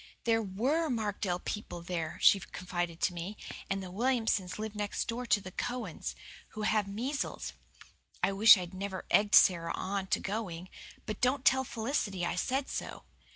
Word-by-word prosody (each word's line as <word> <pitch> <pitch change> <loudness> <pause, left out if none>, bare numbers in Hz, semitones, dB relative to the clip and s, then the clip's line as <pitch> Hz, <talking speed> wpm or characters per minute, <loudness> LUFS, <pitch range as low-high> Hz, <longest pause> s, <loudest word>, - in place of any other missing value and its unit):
"There 225 -1 +3
WERE 255 - 0
Markdale 205 -6 -1
people 180 -3 -5
there," 170 -3 -3
she 200 - +7
confided 175 -2 -4
to 180 - +2
me, 180 +5 -5 0.3
"and 195 0 -1
the 185 - -8
Williamsons 225 -4 0
live 215 0 -4
next 205 -1 -2
door 240 +1 -3
to 210 - +4
the 185 -2 -9
Cowans, 245 +5 -4 0.4
who 215 - -2
have 215 -1 +2
measles. 250 +8 -3 0.7
I - - +4
wish 210 +2 +8
I'd 180 0 -6
never 190 0 -5
egged 205 0 +5
Sara 170 -2 +6
on 195 0 -3
to - - +1
going 185 -4 -4 0.4
but 215 -2 -5
don't 260 +2 +2
tell 265 -3 +5
Felicity 220 -7 -2
I 170 - -1
said 265 +8 0
so. - - -5
205 Hz, 165 wpm, -31 LUFS, 185-230 Hz, 0.7 s, wish